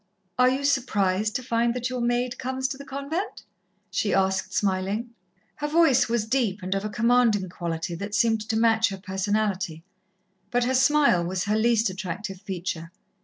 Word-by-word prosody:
"Are 250 0 +6
you 265 +2 -1
surprised 215 -6 +1
to 255 - -2
find 235 0 +1
that 250 +1 -2
your 250 -1 -2
maid 240 +1 0
comes 260 +1 -2
to 275 - -4
the - - -7
convent?" 280 +8 -4 0.5
she 205 - 0
asked, 190 0 +1
smiling. 200 +4 -1 0.5
Her 295 -1 -2
voice 300 -6 +4
was 230 -2 0
deep 220 -5 0
and 185 +1 -1
of 195 0 -2
a 215 - -2
commanding 230 -3 +2
quality 170 -1 -4
that 200 +4 -4
seemed 225 -2 +2
to 220 - +1
match 225 -1 +3
her 195 - -5
personality, 190 -3 -2 0.7
but 245 0 +1
her 255 +2 0
smile 270 -8 +4
was 180 +1 -2
her 210 +1 0
least 225 -2 +2
attractive 190 0 -5
feature. 175 -3 -5
220 Hz, 170 wpm, -25 LUFS, 190-250 Hz, 0.7 s, Are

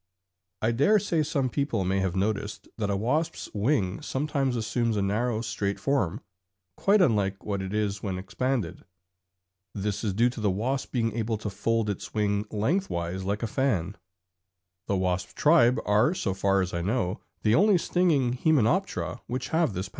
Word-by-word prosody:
I 110 - +3
dare 145 - +4
say 175 -6 0
some 140 -3 0
people 130 -5 -1
may 95 +1 +1
have 95 -2 -1
noticed 100 +1 -2
that 105 -2 -1
a 100 - +1
wasp's 150 +10 -1
wing 100 -4 0
sometimes 135 -2 -1
assumes 115 0 0
a - - +1
narrow 110 +3 0
straight 100 -3 -2
form, 125 -6 0 0.5
quite 200 -1 +4
unlike 100 - +1
what 100 -2 -2
it 95 0 -5
is 105 -1 -1
when 95 -3 -3
expanded. 100 0 -2 0.9
This 100 +1 -2
is 100 -4 -1
due 120 +3 +3
to 120 - -7
the 105 - +2
wasp 125 +8 -2
being 115 -3 0
able 110 -1 -1
to 105 -1 -5
fold 110 +2 0
its 100 +1 -5
wing 105 0 0
lengthwise 100 - -1
like 105 +3 -2
a - - 0
fan. 115 -8 0 0.9
The 100 - +1
wasp 90 -1 -1
tribe 150 -6 +5
are, 105 - +3
so 100 - -1
far 95 0 +2
as 90 0 -3
I 85 - -1
know, 100 0 -1 0.2
the 110 - +3
only 200 - +5
stinging 160 -8 +2
Hymenoptera 160 - +1
which 125 +1 -3
have 160 -8 +1
this 95 +2 -3
power. - - -17
110 Hz, 175 wpm, -27 LUFS, 100-135 Hz, 0.9 s, tribe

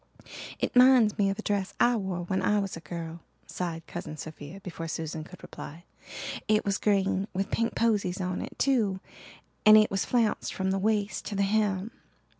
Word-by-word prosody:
"It - - -2
minds 250 -4 +6
me 200 -1 +3
of 195 - -2
a 220 - -6
dress 200 -2 -1
I 245 0 +4
wore 190 -5 -3
when 190 +2 -1
I 210 - +2
was 200 -2 -2
a - - -7
girl," 165 0 -6 0.3
sighed 165 -2 -4
Cousin 155 - -7
Sophia 155 +3 -8
before 170 -3 -6
Susan 160 0 -4
could 180 +3 -13
reply. 165 +4 -9 0.6
"It 215 0 +2
was 200 -1 0
green 195 -1 +1
with 195 +1 -2
pink 230 0 0
posies 205 -6 +1
on 185 -1 -2
it, - - -8
too, 220 -9 +2 0.6
and 215 0 +9
it 215 0 +4
was 195 - 0
flounced 235 -3 0
from 190 -1 0
the 195 - 0
waist 205 -1 0
to 205 - -4
the 200 - +2
hem. 205 0 0
195 Hz, 190 wpm, -28 LUFS, 180-215 Hz, 0.6 s, and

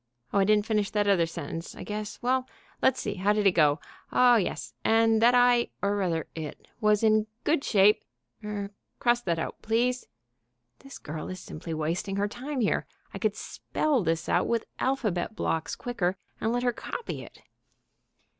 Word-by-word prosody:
Oh, 200 - +4
I 195 - +4
didn't 210 0 +3
finish 210 -3 +1
that 205 -1 0
other 180 -4 +4
sentence, 165 0 -6
I - - -8
guess.... 210 0 -5 0.6
Let's 260 0 +3
see, 205 - -2
how 200 +3 +2
did 210 -1 0
it 195 - +7
go?... 150 -3 +3 0.3
Oh, 250 -1 +6
yes... 210 -6 -1
and 225 0 +4
that 240 +2 +6
I, 245 -1 +5 0.2
or 200 +1 +2
rather 175 -5 0
it, 155 -2 -7
was 210 0 +3
in 215 0 +4 0.2
good 300 -2 +2
shape... 205 0 +4 0.4
er, 205 -1 -4 0.3
cross 240 0 +2
that 170 -6 -1
out, 160 - -4
please 245 +3 0 0.7
(this 275 0 -11
girl 155 +1 -6
is 185 0 -6
simply 160 0 -6
wasting 165 +5 -2
her 200 +1 +1
time 260 +5 -4
here. 215 - +1 0.3
I - - -5
could - - 0
spell 295 -6 -1
this 165 0 -1
out - - +2
with 230 -1 0
alphabet 220 -7 -1
blocks 160 -6 -1
quicker 190 -7 -2 0.2
and 220 - 0
let 245 +1 0
her 245 -1 +2
copy 470 - -5
it) - - -14
210 Hz, 175 wpm, -28 LUFS, 185-240 Hz, 0.7 s, it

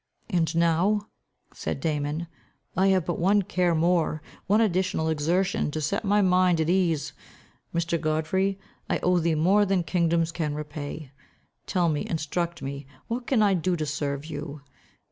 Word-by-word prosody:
"And 165 -2 +1
now," 175 +6 +2 0.4
said - - -4
Damon, 150 0 -2 0.5
"I 190 +2 +3
have 190 -4 +3
but 175 - -2
one 200 +4 +3
care 180 -3 +1
more, 165 -2 +1 0.2
one 205 +3 +4
additional 185 -6 +1
exertion, 165 +3 +1
to 155 - -3
set 160 +9 -1
my 205 0 +3
mind 180 -2 +3
at 160 +1 +1
ease. 175 -5 +1 0.6
My 170 - 0
Godfrey, 170 +4 0 0.3
I - - +2
owe 180 0 +3
thee 165 -1 +1
more 190 +7 +4
than 195 -3 +1
kingdoms 165 0 +1
can 155 -3 -2
repay. 150 -1 -6 0.6
Tell 180 -2 +1
me, 150 -2 0
instruct 170 +2 -2
me, 140 0 -6 0.2
what 240 +1 -3
can 235 -6 +3
I 200 -2 +4
do 180 0 0
to 155 -2 -2
serve 145 -1 -3
you? 150 -2 -6
170 Hz, 160 wpm, -26 LUFS, 155-185 Hz, 0.6 s, one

